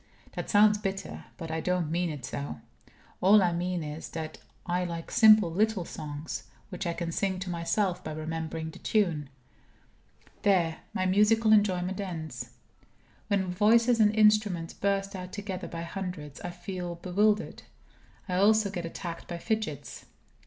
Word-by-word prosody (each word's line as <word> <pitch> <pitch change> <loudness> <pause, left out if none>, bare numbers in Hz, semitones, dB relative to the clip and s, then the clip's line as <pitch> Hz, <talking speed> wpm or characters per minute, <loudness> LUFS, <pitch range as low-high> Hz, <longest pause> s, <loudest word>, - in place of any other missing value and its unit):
That - - -5
sounds 210 0 +5
bitter; 195 -2 -4
but 165 -3 -6
I 160 0 -2
don't 180 -2 0
mean 175 +1 0
it 145 -5 -6
so. 140 0 -5 0.6
All 200 +2 +7
I 175 - +2
mean 175 0 -2
is, 150 +1 -6
that 155 -1 -6 0.3
I 180 0 0
like 170 -2 -5
simple 215 -5 +7
little 205 0 +1
songs, 150 -1 -6 0.2
which 185 -1 -4
I 170 - 0
can 170 0 -3
sing 190 +2 -1
to 185 0 -4
myself 180 +2 0
by 155 - -5
remembering 160 +1 -4
the - - -13
tune. 170 -10 0 1.1
There, 175 -5 +2
my 185 - -1
musical 215 +3 +4
enjoyment 190 -2 +2
ends. 165 -5 -5 0.8
When 190 -3 0
voices 230 +4 +4
and 210 -1 +6
instruments 210 -6 +3
burst 195 0 -1
out 180 -1 -6
together 200 -3 -5
by 165 0 -5
hundreds, 170 -5 -6
I 175 - -4
feel 175 0 -5
bewildered. 205 +5 +1 0.7
I 180 -1 -1
also 210 +1 +4
get 175 -3 -4
attacked 170 0 -7
by 175 - -4
fidgets. 185 - -3
180 Hz, 150 wpm, -29 LUFS, 165-205 Hz, 1.1 s, All